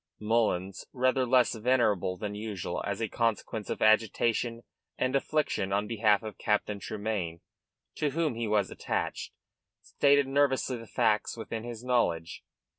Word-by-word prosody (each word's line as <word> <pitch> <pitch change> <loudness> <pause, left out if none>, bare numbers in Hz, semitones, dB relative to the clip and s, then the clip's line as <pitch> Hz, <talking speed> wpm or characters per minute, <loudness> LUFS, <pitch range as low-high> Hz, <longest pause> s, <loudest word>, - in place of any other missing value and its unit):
Mullins, 105 -4 0
rather 130 0 +2
less 125 0 +4
venerable 110 -6 +1
than 105 0 -4
usual, 105 -3 -4
as - - -3
a - - 0
consequence 115 -1 -2
of - - -2
agitation 115 +2 +2 0.3
and 130 +1 0
affliction 135 -9 0
on 100 +1 +1
behalf 105 -1 +2
of 110 -2 -8
Captain 105 -1 0
Tremayne, 100 -6 -3 0.6
to 150 - +1
whom 155 0 0
he 115 0 -3
was 105 -2 +1
attached, - - -3 0.5
stated 140 0 +3
nervously 135 -2 +1
the 115 -1 -10
facts 110 -2 +1
within 115 0 -5
his 120 -1 -7
knowledge. 85 -10 0
115 Hz, 140 wpm, -29 LUFS, 105-125 Hz, 0.6 s, less